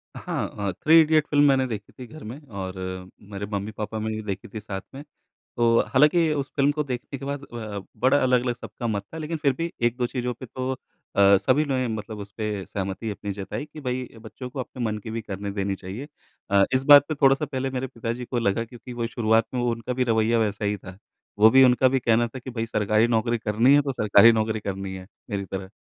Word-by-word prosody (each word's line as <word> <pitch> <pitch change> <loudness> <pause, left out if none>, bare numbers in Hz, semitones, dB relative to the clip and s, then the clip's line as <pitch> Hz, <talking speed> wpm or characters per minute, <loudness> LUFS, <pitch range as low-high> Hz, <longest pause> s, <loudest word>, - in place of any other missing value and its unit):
अ, - - -7
हाँ 100 -1 -3
अ, - - 0
three 160 - +5
idiots 155 -1 +3
film 145 0 +4
मैंने 135 -1 +3
देखी 110 -3 -6
थी 125 - -6
घर 155 0 -12
में 120 +7 -7
और 95 -3 -5 0.6
मेरे 100 +1 -4
मम्मी-पापा 105 +2 -4
ने 110 +1 -2
भी 110 - -4
देखी 105 +3 -5
थी 110 - -4
साथ 95 -2 -6
में। 140 - -8 0.5
तो 120 0 +2 0.2
हालाँकि 155 +4 +4
उस 140 -1 -3
फ़िल्म 140 +1 +4
को 150 - +1
देखने 130 +1 -5
के 135 - -8
बाद 140 0 -4
अ, 110 -5 -6 0.2
बड़ा 130 +3 +3
अलग-अलग 125 -1 +2
सबका 120 0 -7
मत 100 -3 -1
था - - -5
लेकिन 160 +1 -3
फिर 140 -2 +4
भी 165 0 -2 0.2
1-2 120 +1 0
चीज़ों 125 -1 -3
पे 130 - -7
तो 130 +3 -4 0.5
अ, 100 0 +7
सभी 140 +4 +3
ने 130 -3 0
मतलब 110 -1 -5
उस 100 -1 -9
पे 105 -3 -3
सहमति 100 +3 -4
अपनी 100 0 -5
जताई 105 +6 -5
कि, 150 0 -11
"भई, 125 -1 -3
बच्चों 115 +3 -8
को 130 - -5
अपने 125 0 -6
मन 105 -1 -1
की 110 - -5
भी 115 +1 -3
करने 100 -1 -5
देनी 100 0 0
चाहिए।" 100 +11 -8 0.4
अ, 100 -1 +5
इस 130 - +2
बात 145 0 +10
पे 155 - -1
थोड़ा-सा 135 +1 +3
पहले 135 -2 -3
मेरे 130 +1 -1
पिताजी 115 +1 -5
को 120 0 -3
लगा 115 +1 +1
क्योंकि 120 +2 -11
वो 120 -1 -2
शुरुआत 115 -1 +2
में 125 - 0
वो 120 0 +1
उनका 115 +2 -3
भी - - +4
रवैया 115 0 +2
वैसा 105 -1 -1
ही 105 0 0
था। 95 -1 -11 0.4
वो 110 +1 +8
भी 130 +1 +7
उनका 125 +1 +5
भी 135 +1 +1
कहना 120 0 +3
था 130 - -8
कि, 130 +1 -8
"भई, 115 -1 -3
सरकारी 110 +1 +2
नौकरी 115 +1 +1
करनी 115 +5 +3
है 145 - +6
तो 135 -1 -2
सरकारी 110 0 +6
नौकरी 110 -1 0
करनी 95 -1 -4
है, 95 - -10 0.2
मेरी 100 -1 -2
तरह।" 95 0 -6
115 Hz, 235 wpm, -25 LUFS, 105-130 Hz, 0.6 s, बात